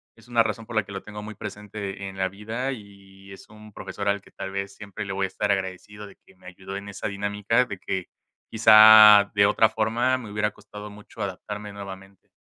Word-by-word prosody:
es 115 - -20
una 120 -1 +3
razón 110 +1 -4
por 115 - -9
la 110 - +2
que 100 - -13
lo 95 0 -6
tengo 105 0 -9
muy 110 0 -8
presente 100 -1 -7
en 95 - -12
la 95 0 0
vida. 110 +7 -4
Y 100 -3 -14
es 95 - -13
un 105 0 -15
profesor 100 +1 -6
al 100 0 0
que - - -21
tal 95 - -7
vez 100 0 -5
siempre 105 0 -8
le 100 - -5
voy 95 0 -1
a - - -2
estar 100 +2 -2
agradecido 100 +2 -4
de 100 - -15
que 95 - -22
me 90 - -17
ayudó 95 +1 -9
en 100 0 -8
esa 100 - -5
dinámica 105 +4 0
de 100 -6 -7
que, 95 -1 -4 0.4
quizá, 110 -2 +8
de 100 0 +5
otra 105 +2 +3
forma 120 +4 0
me 115 -5 -9
hubiera 105 0 -1
costado 105 0 -11
mucho 105 +1 -12
adaptarme 105 +2 -6
nuevamente. 95 -1 -11
105 Hz, 220 wpm, -24 LUFS, 100-110 Hz, 0.4 s, quizá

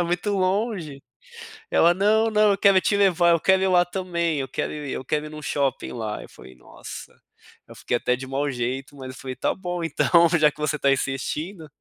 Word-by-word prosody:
é - - +2
muito 175 +4 -1
longe", 185 - -1 0.7
ela 170 +1 +5
"Não, 215 +4 +2
não, 210 -1 +4
eu 200 - +1
quero 195 -1 +5
te 200 - 0
levar, 180 -4 +3
eu 170 - +3
quero 190 +3 +3
ir - - +2
lá 180 -1 +4
também, 170 -3 -2
eu 135 - -3
quero - - -3
ir 150 -3 -6
eu - - -4
quero 150 +3 -1
ir 150 - -9
em - - -8
um 155 - -8
shopping 140 -2 -2
lá", 110 -3 -4
eu - - -12
falei: 65 - -15
"Nossa", 60 - -11 0.5
eu - - -13
fiquei 120 - -1
até 125 +1 0
de 130 +1 -8
mal 140 +2 -1
jeito, 130 +3 -4
mas 130 -2 -9
eu 130 - -13
falei: 130 -1 -6
"Tá - - -1
bom, 175 -2 -4
então 170 +2 +3
já 150 -1 +5
que 150 - -22
você 150 0 -1
tá 140 -1 +2
insistindo". 155 +6 -3
165 Hz, 230 wpm, -23 LUFS, 135-185 Hz, 0.7 s, ela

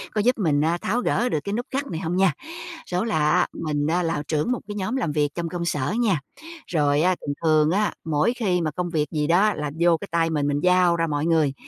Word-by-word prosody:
có 210 - +2
giúp 250 +3 +2
mình 155 -8 +1
á 165 +3 +1
tháo 235 +5 0
gỡ 245 0 +1
được 155 - 0
cái 200 - -3
nút 240 +3 -2
gắt 275 +1 -1
này 160 - -4
hông 170 +2 -2
nha. 190 -1 +4 0.5
Số 180 +3 -1
là 155 -9 +1
á, 180 +1 +3
mình 150 -2 -2
á 175 +2 +1
là 165 -3 -1
trưởng 155 +8 0
một 250 - 0
cái 205 - -6
nhóm 205 +5 -2
làm 220 - -1
việc 150 -1 +1
trong 170 -1 -3
công 175 -1 -3
sở 145 -1 -1
nha. 205 -9 +2 0.5
Rồi 145 -3 +2
á 185 +2 +3
thường 145 - -3
thường 155 -1 +4
á, 210 +2 +1
mỗi 160 +9 +1
khi 190 -8 0
mà 155 -2 -1
công 175 +3 -3
việc 155 -3 0
gì 150 -2 -1
đó 195 +6 +4
là 150 -1 -4
vô 170 -1 +4
cái 200 - -8
tay 165 0 +2
mình, 150 -3 0
mình 145 0 0
giao 180 -1 +4
ra 165 0 0
mọi 145 -1 -1
người. 160 -4 +2
170 Hz, 260 wpm, -24 LUFS, 150-190 Hz, 0.5 s, nha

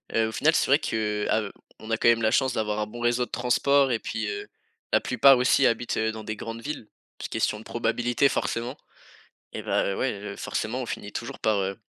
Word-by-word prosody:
heu, 110 0 +2
au - - -6
final, 155 +8 +2
c'est - - +2
vrai 140 +3 +5
que, 105 -5 -1
a 110 - +3
heu, 100 - -6 0.3
on 110 - -8
a 110 - +2
quand 120 - +1
même 115 -1 +5
la 110 -1 +2
chance 130 +1 +2
d'avoir 105 -1 -1
un 105 - -1
bon 120 +3 -9
réseau 120 +1 +2
de - - -23
transport 135 +3 +2
et 115 - +1
puis - - -4
heu, 410 -1 -5 0.5
la - - +5
plupart 135 -1 +5
aussi 125 +2 +4
habitent, 115 +1 -1
heu, 110 0 +1
dans 110 0 -7
des 110 0 -5
grandes 115 +2 -6
villes, 140 -5 -6 0.4
question 105 - -1
de 110 - -13
probabilité, 120 +3 +1
forcément 120 +3 -2 0.7
et - - -5
ben, 100 - 0
ouais, 130 - 0
heu, 100 0 -7
forcément, 125 +4 -3
on - - -5
finit 105 - -6
toujours 120 +1 -6
par, 110 -1 +2
heu, 95 +1 -2
115 Hz, 230 wpm, -26 LUFS, 110-125 Hz, 0.7 s, vrai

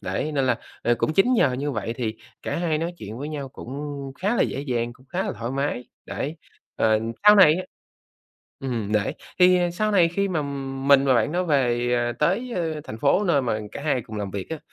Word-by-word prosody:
đấy, 155 - -2
nên 135 -2 +1
là, 120 -2 +2 0.2
à, 120 - +3
cũng 155 - +1
chính 240 +9 +4
nhờ 140 - +3
như 140 +3 -2
vậy 115 -3 -3
thì 110 -3 -3 0.3
cả - - -3
hai 165 -3 0
nói 170 +2 -2
chuyện 110 +3 -7
với 145 +2 -5
nhau 145 -3 -5
cũng 140 +1 -7
khá 210 +5 +1
là - - +4
dễ 135 - -2
dàng, 120 -4 -2
cũng 130 +2 -22
khá 180 +5 -2
là - - -2
thoải 115 +1 -5
mái, 135 -2 -2 0.2
đấy. 150 +4 -4 0.4
Ờ, 110 -1 +3 0.3
sau 210 - +10
này 180 -6 +7
á 185 - -2 1.0
ừm, 115 -6 -3
đấy, 105 -1 +1 0.2
thì 180 0 +6
sau 215 +4 0
này 180 -5 +5
khi 200 +3 -1
mà 160 -5 0 0.4
mình 140 -1 +6
và 130 -2 +4
bạn 120 +6 +2
đó 180 +1 0
về, 120 -6 +1
ờ, 120 0 0
tới, 190 - 0
ơ, 160 -3 -2
thành 110 - -7
phố 165 - +3
nơi 145 -7 +3
mà 110 -3 -1
cả - - -6
hai 140 -6 0
cùng 110 0 -9
làm 100 -2 -3
việc 100 +5 -6
á, 160 - -3
140 Hz, 230 wpm, -24 LUFS, 120-170 Hz, 1.0 s, sau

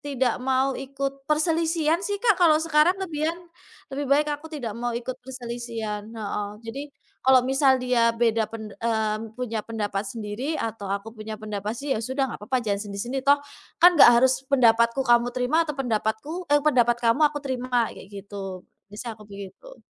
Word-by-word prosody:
tidak 265 -4 0
mau 265 +1 +1
ikut 275 +1 -3 0.2
perselisihan 320 +1 +1
sih 405 +1 -2
Kak 435 -5 +4
kalau 325 -3 +6
sekarang 320 +3 +3
lebihan. 320 -2 -2 0.6
Lebih 285 +1 -3
baik 290 +2 +4
aku 295 +2 -6
tidak 245 -8 -4
mau 240 0 -2
ikut 245 +2 -5
perselisihan. 235 -4 -5
Heeh. 210 -2 -3 0.2
Jadi 230 +4 -6 0.4
kalau 260 -1 +5
misal 265 0 +4
dia 250 -2 +2
beda 225 -2 +2
pen 220 -2 -8
eee, 220 -2 0 0.2
punya 235 -3 -3
pendapat 210 -2 -3
sendiri 230 +8 -4
atau 220 -3 -4
aku 200 +3 -4
punya 215 -1 -7
pendapat 210 +1 -4
sih 280 +2 -2
ya 220 - -1
sudah 260 +4 -1
nggak - - -8
papa 255 -2 0
sendiri-sendiri. 205 +5 -3
Toh 285 - +8 0.4
kan 355 +1 +7
nggak 320 - +8
harus 260 +2 +3
pendapatku 235 -1 +4
kamu 240 -1 +4
terima 250 +4 +1
atau 300 - -3
pendapatku 250 +7 -2
eee, 290 0 +3
pendapat 240 -5 +4
kamu 235 +3 +1
aku 295 - -10
terima, 250 -3 0
kayak - - -12
gitu. 195 -2 -8 0.2
Bisanya 215 +3 -6
aku 210 - -14
begitu. 200 - -11
245 Hz, 170 wpm, -25 LUFS, 220-280 Hz, 0.6 s, Toh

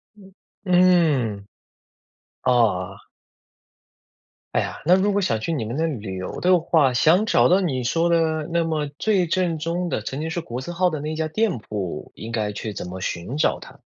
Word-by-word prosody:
嗯， 195 -2 -17 0.3
嗯。 165 - +3 1.0
哦。 100 -7 +2 1.6
哎 - - +3
呀， - - -4
那 180 +3 +6
如 200 +1 +1
果 200 - +1
想 115 - 0
去 165 +9 -2
你 120 - -2
们 115 +6 -4
那 165 - +1
旅 105 - -4
游 95 - -6
的 180 -1 +4
话， 155 -6 +2
想 170 - +4
找 - - +4
到 185 +2 +4
你 130 -8 -1
说 165 +6 +1
的 160 -2 +1
那 170 -1 +1
么 155 -2 -1
最 200 -5 +2
正 170 -1 0
宗 170 +3 -2
的 110 - -2
曾 135 +6 -5
经 160 +1 -3
是 170 0 -3
国 125 -5 -6
字 175 +7 -6
号 180 +1 +2
的 155 -3 -4
那 155 +2 -4
一 - - -4
家 160 0 -2
店 215 - 0
铺， 105 -5 -5
应 115 +1 -8
该 105 -2 -1
去 105 +1 -5
怎 - - -6
么 90 +1 -7
寻 90 - -4
找 - - +1
它？ - - -13
155 Hz, 210 characters per minute, -23 LUFS, 115-175 Hz, 1.6 s, 那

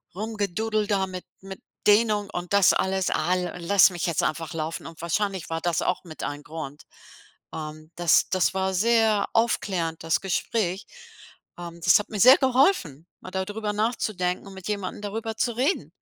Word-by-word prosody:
Rumgedoodle 215 +1 -2
da 195 -2 +1
mit 185 -1 -7 0.2
mit 190 0 -9 0.3
Dehnung 210 -1 +3
und 175 +2 -5
das 200 -2 +6
alles 190 0 0
al 180 0 -1
lass 200 +4 +5
mich 175 -3 -4
jetzt 170 -3 0
einfach 165 +1 -2
laufen 165 +2 -4
und 165 -1 -11
wahrscheinlich 190 +1 -2
war 165 0 -2
das 175 -2 0
auch - - -1
mit 160 -3 -10
ein 145 0 -5
Grund. 150 -2 -8 0.7
Ähm, 155 0 -8
das 175 -2 +3
das 185 0 +1
war 190 0 0
sehr 220 +1 +3
aufklärend, 185 -8 0
das 165 0 +1
Gespräch. 195 0 -2 0.7
Ähm, 170 -1 -8
das - - +6
hat 210 - -6
mir 210 - -5
sehr 255 +6 +8
geholfen, 250 - +2
mal - - -9
da 190 0 -2
drüber 210 +1 -3
nachzudenken 205 -4 -1
und 195 - -10
mit 190 0 -9
jemanden 205 -2 -4
darüber 220 +2 -4
zu 240 0 0
reden. 280 +9 0
190 Hz, 170 wpm, -25 LUFS, 170-215 Hz, 0.7 s, sehr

